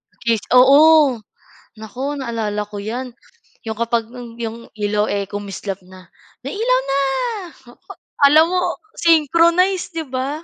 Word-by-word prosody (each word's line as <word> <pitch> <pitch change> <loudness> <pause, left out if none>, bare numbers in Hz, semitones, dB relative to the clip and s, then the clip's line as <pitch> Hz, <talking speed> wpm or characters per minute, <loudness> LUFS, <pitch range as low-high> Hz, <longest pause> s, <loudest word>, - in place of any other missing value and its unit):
At - - -42
least, 225 -2 0
oo. 280 0 +6 0.6
Naku, 230 +4 -8 0.2
naalala 225 -5 -3
ko 205 - -7
yan, 235 +6 -4 0.6
yung 220 -1 -5
kapag 235 -1 0
yu 250 - -9 0.3
yung 225 +1 -6 0.3
ilaw, 210 0 +1
eh, 200 - -2
kumislap 200 -1 -6
na. 185 0 -13 0.4
May - - -5
ilaw - - +3
na! 275 +1 +1 0.7
Oh, - - -15 0.3
alam 310 +3 +6
mo, 365 - +1 0.4
synchronize 335 +4 +3
'di 325 -1 -3
ba? 260 +1 -3
255 Hz, 140 wpm, -19 LUFS, 215-315 Hz, 0.7 s, oo